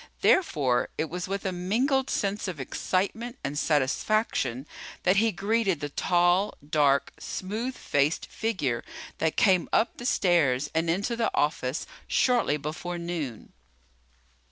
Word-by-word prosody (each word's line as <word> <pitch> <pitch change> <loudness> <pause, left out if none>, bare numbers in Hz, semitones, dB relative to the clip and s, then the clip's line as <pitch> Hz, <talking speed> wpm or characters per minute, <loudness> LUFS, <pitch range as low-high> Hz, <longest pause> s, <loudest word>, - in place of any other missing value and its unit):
Therefore, 140 - +3
it 155 0 -2
was 180 +1 -4
with 195 +1 -3
a 190 - 0
mingled 245 +10 +1
sense 200 +1 -1
of 175 -5 -5
excitement 205 - -2
and 140 0 -3
satisfaction 145 - 0 0.4
that 185 +2 +3
he 225 +2 +4
greeted 200 -2 0
the 145 -1 -4
tall, 175 +5 +2
dark, 145 -2 +2
smooth 220 +7 -4
faced 145 +3 0
figure 165 - -2 0.4
that 160 -1 0
came 185 -4 +4
up 230 - +2
the 240 - -4
stairs 145 - +2
and 165 +1 +1
into 200 +8 0
the 230 -1 +1
office 145 -2 0 0.2
shortly 240 - +2
before 160 +4 -5
noon. 170 -9 -5
175 Hz, 130 wpm, -27 LUFS, 145-210 Hz, 0.4 s, he